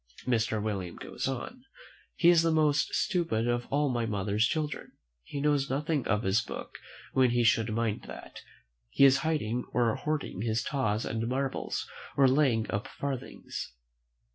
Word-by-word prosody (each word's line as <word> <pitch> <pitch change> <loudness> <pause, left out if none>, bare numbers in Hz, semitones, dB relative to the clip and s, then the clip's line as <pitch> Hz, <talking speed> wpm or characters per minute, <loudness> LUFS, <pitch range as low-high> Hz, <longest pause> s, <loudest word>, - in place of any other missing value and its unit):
Mr. 110 -3 +1
William 100 -5 -3
goes - - -4
on, 135 - -5 0.5
"He 170 - +5
is 170 -2 +6
the 165 - +2
most 150 -2 +2
stupid 165 - 0
of 120 0 0
all 145 +1 +1
my 120 -3 0
mother's 105 +1 +1
children; 155 -2 -3 0.3
he 140 - -6
knows 145 -1 +1
nothing 145 +1 -1
of 105 +3 +1
his 95 +3 +2
book; - - -8 0.3
when 130 -1 +4
he 120 0 +2
should 115 -1 +3
mind 110 -1 -1
that, - - -10 0.5
he 140 - +5
is 135 -1 +6
hiding 125 -7 -1
or 120 -2 +3
hoarding 150 -11 -3
his 110 -1 0
taws 110 -6 -1
and 115 +1 -2
marbles, 135 +2 -2 0.3
or 135 -1 +6
laying 130 -5 +3
up 100 - -2
farthings. 135 - -5
125 Hz, 160 wpm, -29 LUFS, 110-145 Hz, 0.5 s, is